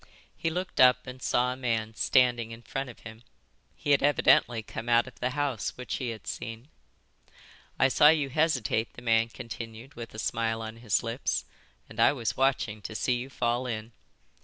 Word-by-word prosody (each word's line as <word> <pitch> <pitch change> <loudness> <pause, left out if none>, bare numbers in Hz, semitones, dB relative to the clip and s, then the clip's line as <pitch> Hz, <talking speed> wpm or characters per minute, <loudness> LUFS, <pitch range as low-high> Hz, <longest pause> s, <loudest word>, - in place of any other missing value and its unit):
He 165 - -1
looked 180 +3 -4
up 125 0 +6
and 125 0 -9
saw 125 0 +1
a - - -8
man 115 -4 -1
standing 120 -1 +2
in 115 +1 -10
front 135 +1 -4
of 120 - -13
him. 110 0 -11 0.5
He 145 - -2
had 140 - +5
evidently 120 -5 +4
come 115 +2 -6
out 120 0 +5
of 130 - -13
the 125 - 0
house 140 -7 -1
which 125 -1 -4
he 125 - -3
had 115 -2 -7
seen. 115 +4 -6 1.1
"I 135 - +5
saw 145 +3 +5
you 150 -3 +2
hesitate," 130 -7 +1
the 120 - -12
man 115 -1 +3
continued, 115 +1 -8
with 115 -3 -9
a - - -7
smile 115 0 -1
on 110 +1 -7
his 115 -1 0
lips, 115 +3 -2 0.4
"and - - -12
I - - +6
was 120 -7 -2
watching 130 -6 0
to 110 - -7
see 125 - +1
you 125 +2 -6
fall 120 -1 -1
in." 110 -1 -4
120 Hz, 190 wpm, -28 LUFS, 115-130 Hz, 1.1 s, up